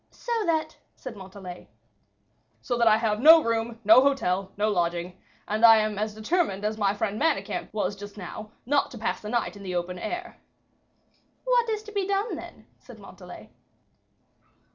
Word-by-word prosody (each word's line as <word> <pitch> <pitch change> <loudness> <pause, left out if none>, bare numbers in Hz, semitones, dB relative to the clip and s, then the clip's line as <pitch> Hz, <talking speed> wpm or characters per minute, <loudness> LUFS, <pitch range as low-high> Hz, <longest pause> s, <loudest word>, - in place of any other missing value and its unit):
"So 485 - -9 0.2
that 320 -2 -1
" - - -45
said 255 -4 -9
Montalais. 190 -2 -10 0.9
"So 245 - -3
that 235 - +4
I 215 -1 +6
have 215 -2 0
no 320 +4 +8
room, 230 0 -2
no 220 +4 +7
hotel, 195 -9 0
no 210 +1 +1
lodging; 175 -2 -1 0.3
and 215 +2 -2
I 225 -1 +9
am 215 -1 -1
as 215 0 -3
determined 220 - -1
as 215 +1 -1
my 200 -1 +1
friend 205 0 -2
Manicamp 290 -11 -1
was 205 -2 -2
just 205 +1 -11
now, 210 +3 -8 0.2
not 285 +3 +1
to 245 - -10
pass 220 - -3
the 210 - -7
night 235 -1 -1
in 200 - -11
the 185 -2 -5
open 180 +1 -3
air." 355 - -6 1.0
"What - - +2
is 430 -1 -2
to 430 - -11
be 400 -2 -2
done, 400 +3 -1
then?" - - -11
said - - -14
Montalais. - - -13
215 Hz, 180 wpm, -26 LUFS, 200-280 Hz, 1.0 s, I